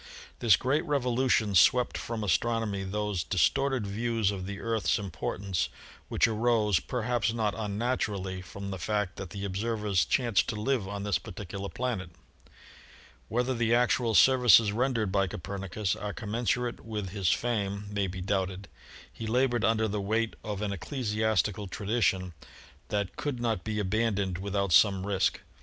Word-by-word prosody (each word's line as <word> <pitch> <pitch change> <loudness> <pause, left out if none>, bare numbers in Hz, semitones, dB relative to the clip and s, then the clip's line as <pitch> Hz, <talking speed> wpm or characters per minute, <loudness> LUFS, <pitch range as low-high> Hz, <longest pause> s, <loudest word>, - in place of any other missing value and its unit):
This 115 -6 +6
great 140 +5 0
revolution 125 -6 +1
swept 125 +7 +4
from 115 -2 -4
Astronomy 105 +1 0
those 100 -2 -2
dis 90 -4 +3
torted 135 -5 -1
views 110 0 0
of 95 -2 -5
the 100 0 -5
Earth's 115 -2 0
importance 95 -1 -3 0.4
which - - +3
arose, 110 -4 +2
per 125 -3 -4
haps 120 -1 +1
not 110 -3 0
unnaturally, 105 -4 -2
from 100 +2 -7
the 95 - -5
fact 105 0 -1
that 95 - -6
the 100 +2 -5
observers 105 -1 0
chanced 120 -6 +2
to 110 - -2
live 120 -3 0
on 100 0 -5
this 100 -5 +1
particular 100 +2 -7
planet. 105 -3 -3 1.2
Whether 125 +3 0
the 120 -1 +2
actual 120 -1 +2
services 125 -4 +6
rendered 115 -3 0
by 100 0 +2
Copernicus 95 +3 -3
are 105 -1 -5
commensurate 120 +2 -1
with 105 -4 -5
his 95 -3 0
fame 100 -1 -1
may 100 -1 0
be 90 0 -6
doubted. 95 0 -2 0.4
He 115 - -6
labored 120 0 +1
under 110 -1 +2
the 105 0 -2
weight 110 +3 0
of 105 -1 -4
an 100 -1 -1
ecclesiastical 105 - -1
tradition 95 -2 0 0.5
that 100 -3 -2
could 145 -4 -3
not 115 -5 -1
be 110 -1 -3
abandoned 100 -2 0
without 100 -1 -1
some 95 -1 +5
risk. 100 -2 0
105 Hz, 150 wpm, -29 LUFS, 100-115 Hz, 1.2 s, This